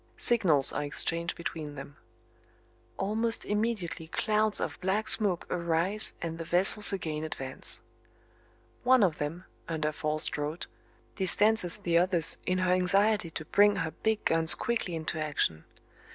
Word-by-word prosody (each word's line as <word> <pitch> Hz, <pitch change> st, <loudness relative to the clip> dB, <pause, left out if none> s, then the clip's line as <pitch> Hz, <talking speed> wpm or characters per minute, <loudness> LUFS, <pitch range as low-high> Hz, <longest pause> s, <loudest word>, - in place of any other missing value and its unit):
Signals 170 Hz, -, +2 dB
are 145 Hz, -, -2 dB
exchanged 165 Hz, +3 st, -3 dB
between 155 Hz, -3 st, -6 dB
them. 140 Hz, +1 st, -10 dB, 1.0 s
Almost 225 Hz, +4 st, -1 dB
immediately 210 Hz, -6 st, -3 dB
clouds 215 Hz, +4 st, +1 dB
of -, -, -5 dB
black 200 Hz, +4 st, -1 dB
smoke 200 Hz, -7 st, +4 dB
arise 170 Hz, +5 st, 0 dB
and 165 Hz, 0 st, -5 dB
the -, -, -4 dB
vessels 185 Hz, +5 st, +6 dB
again 160 Hz, -5 st, -4 dB
advance. 135 Hz, -4 st, -1 dB, 1.0 s
One 255 Hz, -2 st, +4 dB
of 170 Hz, -5 st, 0 dB
them, 160 Hz, +5 st, -5 dB, 0.2 s
under 155 Hz, -2 st, -2 dB
forced 155 Hz, 0 st, -2 dB
draught, 150 Hz, +3 st, -5 dB, 0.5 s
distances 205 Hz, 0 st, +2 dB
the 170 Hz, -4 st, +1 dB
others 175 Hz, -3 st, 0 dB
in 185 Hz, -, 0 dB
her 185 Hz, 0 st, +1 dB
anxiety 195 Hz, +1 st, +1 dB
to 160 Hz, -1 st, -7 dB
bring 205 Hz, +5 st, +3 dB
her 165 Hz, -1 st, -3 dB
big 220 Hz, +3 st, -2 dB
guns 165 Hz, 0 st, +4 dB
quickly 230 Hz, -7 st, -3 dB
into 160 Hz, -1 st, -4 dB
action. 85 Hz, -, -2 dB
175 Hz, 135 wpm, -28 LUFS, 160-210 Hz, 1.0 s, vessels